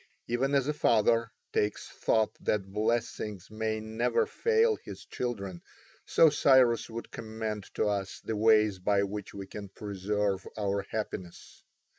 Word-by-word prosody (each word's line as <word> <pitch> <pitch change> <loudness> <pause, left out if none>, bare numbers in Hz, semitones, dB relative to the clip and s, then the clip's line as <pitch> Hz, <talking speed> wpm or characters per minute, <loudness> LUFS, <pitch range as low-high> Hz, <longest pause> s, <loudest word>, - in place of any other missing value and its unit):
Even 135 +4 +1
as 135 -1 +2
a 150 - +1
father 115 -3 +3 0.2
takes 105 0 0
thought 110 -1 +1
that 95 -2 -1
blessings 105 -3 -2
may 110 0 -2
never 110 - 0
fail 455 0 +2
his - - -10
children, 100 -8 -4 0.5
so 165 - +6
Cyrus 130 -5 +4
would 115 +1 -7
commend 110 -2 -5
to - - +1
us 100 -2 -2
the 110 - -3
ways 105 -2 +4
by 100 +1 +2
which 100 0 -5
we 100 -1 -6
can 100 +1 -8
preserve 100 -1 -2
our 100 -1 -1
happiness. 95 -5 -6
110 Hz, 140 wpm, -30 LUFS, 100-115 Hz, 0.5 s, so